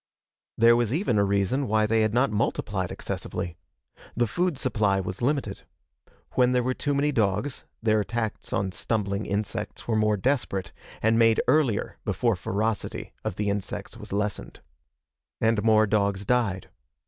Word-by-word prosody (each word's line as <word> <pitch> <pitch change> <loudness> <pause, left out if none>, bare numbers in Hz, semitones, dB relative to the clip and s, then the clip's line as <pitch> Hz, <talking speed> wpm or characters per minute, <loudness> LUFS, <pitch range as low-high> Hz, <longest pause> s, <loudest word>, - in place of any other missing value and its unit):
There 115 +1 +6
was 120 -2 +1
even 140 - +1
a - - +4
reason 100 +7 +1
why 110 0 +3
they 110 +1 +2
had 110 -1 +2
not 125 +3 +2
multiplied 105 -3 -1
excessively. 85 -1 -4 0.6
The 120 - +3
food 170 - 0
supply 105 -7 +1
was 95 +2 -4
limited. 130 -6 -1 0.7
When 125 0 +3
there 125 -1 +2
were 130 +1 0
too 145 +2 -1
many 145 +1 +2
dogs, 110 +3 0 0.2
their 110 -1 +3
attacks 110 +1 -3
on 95 -1 0
stumbling 100 +1 -2
insects 100 0 -3
were 115 - +1
more 105 -1 +2
desperate, 110 -4 -1 0.3
and 110 +1 +4
made 115 -1 +5
earlier 130 -6 +1
before - - +1
ferocity 110 +2 -2
of - - -3
the 105 0 0
insects 100 -1 -4
was - - -10
lessened. 105 +1 -3 0.8
And 110 -1 +2
more 110 -1 +5
dogs 100 -2 0
died. 110 -6 0
110 Hz, 155 wpm, -26 LUFS, 100-120 Hz, 0.8 s, There